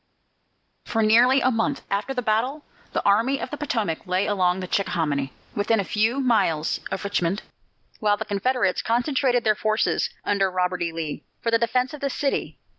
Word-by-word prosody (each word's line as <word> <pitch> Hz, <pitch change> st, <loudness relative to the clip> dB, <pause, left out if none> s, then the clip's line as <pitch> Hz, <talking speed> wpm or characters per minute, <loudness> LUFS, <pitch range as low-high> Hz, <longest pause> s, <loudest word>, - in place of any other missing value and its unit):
For 225 Hz, -1 st, 0 dB
nearly 245 Hz, +5 st, +5 dB
a 255 Hz, -, +3 dB
month 235 Hz, +4 st, -1 dB
after 200 Hz, +6 st, -1 dB
this 250 Hz, -2 st, -2 dB
battle, 250 Hz, +8 st, 0 dB, 0.3 s
the -, -, -2 dB
Army 230 Hz, +7 st, +3 dB
of -, -, -5 dB
the -, -, -3 dB
Potomac 220 Hz, -, -2 dB
lay 185 Hz, +2 st, +1 dB
along 185 Hz, -3 st, +1 dB
the 185 Hz, -, -5 dB
Chickahominy, 150 Hz, -8 st, -1 dB, 0.2 s
within 210 Hz, +2 st, +2 dB
a -, -, +1 dB
few 220 Hz, +7 st, +1 dB
miles 200 Hz, -, +1 dB
of 190 Hz, -, -4 dB
Richmond, 200 Hz, -1 st, -1 dB, 0.6 s
while 205 Hz, -1 st, +2 dB
the 220 Hz, -, -4 dB
Confederates 210 Hz, 0 st, 0 dB
concentrated 245 Hz, +1 st, +1 dB
their 215 Hz, -, +4 dB
forces, 215 Hz, +1 st, 0 dB, 0.2 s
under 195 Hz, -1 st, +2 dB
Robert 180 Hz, -1 st, -1 dB
E. 170 Hz, -1 st, -1 dB
Lee, 160 Hz, -2 st, -5 dB, 0.2 s
for 230 Hz, -, -1 dB
the 230 Hz, -, +4 dB
defence 250 Hz, +3 st, 0 dB
of 300 Hz, -, -8 dB
the 280 Hz, -, 0 dB
city. 275 Hz, +1 st, -2 dB
215 Hz, 180 wpm, -24 LUFS, 190-250 Hz, 0.6 s, nearly